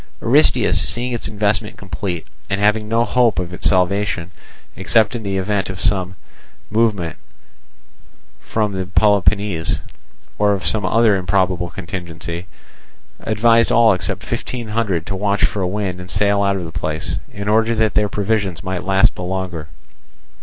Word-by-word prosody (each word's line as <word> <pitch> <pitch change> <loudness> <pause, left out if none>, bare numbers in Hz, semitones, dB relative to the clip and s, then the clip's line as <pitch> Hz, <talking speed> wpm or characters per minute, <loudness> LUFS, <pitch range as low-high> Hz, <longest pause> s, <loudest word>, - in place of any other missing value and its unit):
Aristeus, - - +3
seeing 120 - -3
its 120 - -3
investment 105 +1 -1
complete, 95 -3 -5 0.2
and 100 0 0
having 105 +1 +2
no 115 +1 +2
hope 120 -1 +2
of 90 -1 -3
its - - +2
salvation, 95 -1 0 0.4
except 110 -2 +3
in 120 - -4
the 100 -2 -2
event 95 0 -1
of 95 -1 -6
some 95 -4 0 0.6
movement 105 -6 +1 1.2
from 105 -2 -1
the 95 -1 -3
Peloponnese, 100 -3 +2 0.6
or 105 0 +4
of 95 - -3
some 105 -4 +1
other 115 0 +4
improbable 90 -2 0
contingency, 85 -1 -6 0.7
advised 115 +1 +3
all 115 -2 +6
except 90 - -2
five - - -3 0.3
hundred 100 -8 -1
to 95 - -3
watch 100 +1 +1
for 100 - -2
a 90 - 0
wind 95 -2 -3
and 90 0 -9
sail 100 +1 +2
out 100 0 +2
of 90 -3 -4
the 80 - -7
place, 80 -1 -3
in 100 0 -6
order 110 +2 +2
that 110 -1 +1
their 105 -1 +2
provisions 100 -3 -1
might 95 -1 -3
last 95 0 +3
the - - -8
longer. 90 -3 -4
100 Hz, 155 wpm, -19 LUFS, 90-105 Hz, 1.2 s, all